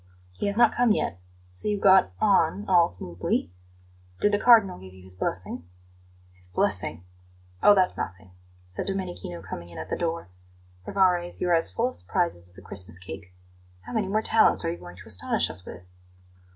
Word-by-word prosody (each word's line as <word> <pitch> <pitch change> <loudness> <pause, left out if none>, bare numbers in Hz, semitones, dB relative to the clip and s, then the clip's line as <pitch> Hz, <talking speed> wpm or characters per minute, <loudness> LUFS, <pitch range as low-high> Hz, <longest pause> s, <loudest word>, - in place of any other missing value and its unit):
"He 90 - -4
has 200 +1 -2
not 235 -1 +5
come 240 -2 +3
yet. 90 - -2 0.3
So 90 - -6
you 205 -1 0
got 190 -1 +5
on 200 -1 +2
all 175 -3 +5
smoothly? 90 -1 -2 0.7
Did 205 - +3
the 205 - +1
Cardinal 220 - +5
give 95 0 -13
you 95 - -15
his 95 0 -7
blessing?" 90 -1 -4 0.6
"His 90 0 -8
blessing? 85 -2 -1 0.6
Oh, 205 - +7
that's 185 -2 +2
nothing," 95 0 -6 0.4
said 90 - -5
Domenichino, 180 - -5
coming 85 0 -8
in 85 - -12
at 80 +2 -7
the - - +1
door. 165 - -3 0.6
"Rivarez, 180 -3 +2
you're 180 -1 +1
as 165 -1 +5
full 240 +2 0
of 255 - -4
surprises 170 - -1
as 90 - -4
a 95 - -12
Christmas 90 -2 -7
cake. 95 0 -10 0.5
How - - -10
many 215 -4 0
more 215 +3 0
talents 220 -6 +3
are 165 - 0
you 170 - -6
going 90 0 -11
to 95 - -12
astonish 100 -6 -1
us 90 +3 -3
with?" 90 - -9
165 Hz, 185 wpm, -26 LUFS, -, 0.7 s, Oh